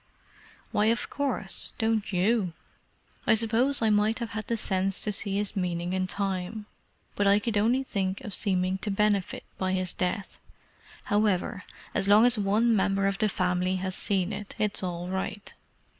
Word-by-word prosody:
"Why, 210 - +2
of 230 +2 0
course—don't 225 -4 -1
you? 190 0 +1 0.7
I - - +6
suppose 230 +4 +2
I 220 - +3
might 210 +2 +2
have 235 -2 -5
had 215 0 -5
the 230 - 0
sense 195 -2 0
to 210 - +1
see 200 -1 +2
his 205 +1 -2
meaning 175 -2 -2
in 185 0 0
time, 195 +2 -3 0.5
but 205 - +1
I 200 +1 +6
could 215 +1 -2
only 235 +6 +2
think 195 -6 -2
of 205 - -7
seeming 185 -1 0
to 210 - -2
benefit 200 -1 0 0.2
by 185 0 0
his 185 -2 0
death. 185 +2 -3 0.6
However, 205 -3 0 0.3
as 195 - 0
long 210 +3 +7
as 245 0 +4
one 215 +3 +2
member 195 -1 +1
of 195 0 0
the 215 -1 +2
family 180 0 0
has 185 0 -3
seen 195 +1 0
it, 205 0 -7
it's 210 -1 0
all 175 -1 -4
right." 190 +2 -4
200 Hz, 170 wpm, -27 LUFS, 185-215 Hz, 0.7 s, long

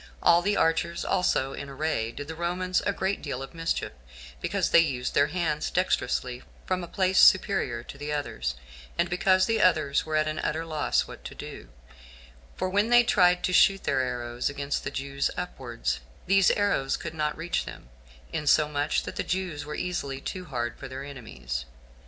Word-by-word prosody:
All 170 0 +6
the 205 +2 +1
archers 165 +1 +1
also 135 -7 +1
in 140 - -7
array 135 -5 -1
did 145 +4 -7
the 160 - -5
Romans 180 +2 -1
a - - +3
great 195 0 -2
deal 135 -3 -4
of 135 - -10
mischief, 165 0 -2 0.5
because - - 0
they - - +8
used 135 -7 0
their 145 - +4
hands 155 -4 -1
dexterously 125 -8 0 0.2
from 185 -1 -1
a - - -6
place 185 +1 +2
superior - - +4
to - - -11
the 150 +1 -4
others, 65 - -2 0.4
and - - +1
because 185 +1 +3
the 225 -1 +1
others 155 -6 +3
were 155 0 -3
at 155 0 +2
an 155 0 -2
utter 160 +2 -2
loss 155 -2 +1
what - - -11
to - - -7
do; - - -9 0.9
for - - -1
when 205 +4 +1
they 240 0 +7
tried 180 -5 +4
to 185 - 0
shoot 195 +2 +5
their 130 - +1
arrows 120 -1 -2
against 140 0 -3
the - - -2
Jews 140 0 -2
upwards, 120 - -3 0.3
these 195 0 +5
arrows 200 -10 +1
could - - -6
not 150 -1 -1
reach 165 +2 -1
them, - - -10 0.4
insomuch 150 0 +2
that - - -7
the - - 0
Jews 180 -6 -3
were 150 0 -5
easily 140 -7 -3
too 185 +6 -5
hard 120 -6 -3
for 135 - -7
their 130 +1 -6
enemies. 65 - -6
155 Hz, 185 wpm, -27 LUFS, 135-180 Hz, 0.9 s, they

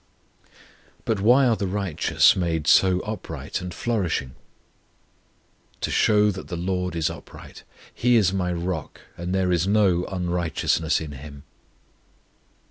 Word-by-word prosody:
But 110 -3 0
why 125 +6 +5
are 120 -2 +3
the 100 - -3
righteous 95 -5 +2
made 80 -4 -1
so 90 +1 +4
upright 80 -8 -5
and 90 0 -6
flourishing? 90 - -2 1.5
To - - -2
show 105 -1 +3
that 95 - -8
the 85 - -5
LORD 90 0 -2
is 80 -2 0
upright; - - -12 0.3
He 125 +1 +2
is 100 -5 +3
my 90 -2 -1
ROCK, 85 -2 -4
and 85 +1 -5
there 95 -1 +1
is 90 +1 +1
no 100 -4 +2
unrighteousness 85 -3 -1
in 75 -2 -6
Him. 70 0 -10
90 Hz, 130 wpm, -24 LUFS, 85-100 Hz, 1.5 s, why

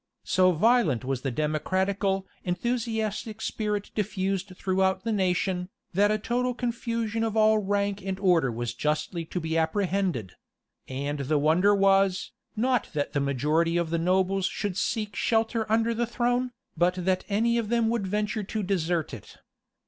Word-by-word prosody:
[*] - - -54
So 185 0 +4
violent 175 - +3
was 130 -1 -2
the 135 - -1
democratical, 190 +7 0 0.2
enthusiastic 220 +2 -2
spirit 210 -2 -2
diffused 195 -2 -2
throughout 190 0 +1
the 230 - -1
nation, 185 -2 0 0.2
that 205 +3 +4
a 215 - +2
total 245 +3 -1
confusion 230 -2 -2
of 225 -1 -1
all 215 0 +5
rank 200 0 -1
and 190 0 -3
order 175 -9 +3
was 120 +1 -3
justly 150 +6 -2
to 180 - -4
be 160 -1 -3
apprehended; 180 - 0 0.6
and 140 +2 -3
the 145 +2 +1
wonder 170 +8 +4
was, 195 -1 +3 0.2
not 250 +1 +1
that 145 -2 -2
the 145 - +1
majority 150 +5 +1
of 170 -2 -1
the 170 - +1
nobles 190 +2 +2
should 205 -4 -3
seek 210 +1 -2
shelter 225 -1 0
under 230 +1 +2
the 235 +1 -1
throne, 245 +1 0 0.3
but 175 +2 +2
that 185 -1 +1
any 230 +3 +2
of 220 -2 -3
them 230 -1 +2
should 225 -5 -1
venture 210 +2 -1
to 210 +1 -3
desert 175 -5 -1
it. 115 - -10
195 Hz, 160 wpm, -27 LUFS, 170-220 Hz, 0.6 s, all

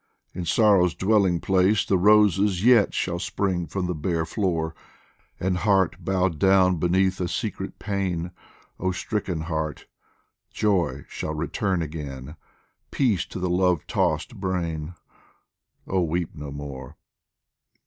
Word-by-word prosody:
in 90 -1 -5
sorrow's 90 -2 +4
dwelling 95 -4 +2
place 95 +3 +2
The 95 - +2
roses 100 0 +4
yet 120 -5 +6
shall 85 - -2
spring 95 -1 -1
from 95 +4 -3
the 90 - -1
bare 80 +1 -1
floor! 80 -3 -1 0.7
And 90 0 0
heart 95 -3 +1
bowed 95 -3 0
down 95 -1 +4
beneath 95 +3 +1
a 90 - 0
secret - - -4
pain 90 -4 -2 0.5
Oh 95 +1 0
stricken 90 -3 -3
heart! 80 -2 -3 0.6
joy 90 -10 0
shall 75 - -5
return 85 +3 -1
again, 75 -2 -7 0.5
Peace 115 - +1
to - - -8
the 90 0 -1
love 90 -2 +1
tossed - - -1
brain 85 -4 -3 0.9
oh, 95 -1 0
weep 85 0 -1
no 75 -2 -7
more 70 -3 -8
90 Hz, 130 wpm, -24 LUFS, 80-95 Hz, 0.9 s, yet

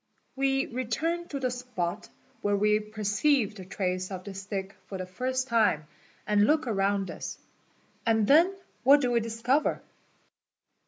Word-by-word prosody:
We 270 0 +1
retvrn 310 +8 -2
to 280 - -3
the 255 -2 0
spot 245 -9 -4 0.3
where 205 0 +1
we 210 +1 +3
perceived 215 +3 +1
the 190 - -8
trace 185 -1 -2
of 185 -2 -6
the 200 - -7
stick 195 0 -5
for 195 - -5
the 185 - -4
first 255 +7 -2
time 220 -10 +2 0.4
and 210 0 +3
look 305 -1 +3
around 195 -4 0
us, - - -6 0.7
and 220 -2 +3
then 325 - +6 0.3
what 280 +3 +7
do 250 -2 +1
we 235 - +3
discover? 230 +6 0
220 Hz, 150 wpm, -28 LUFS, 195-260 Hz, 0.7 s, what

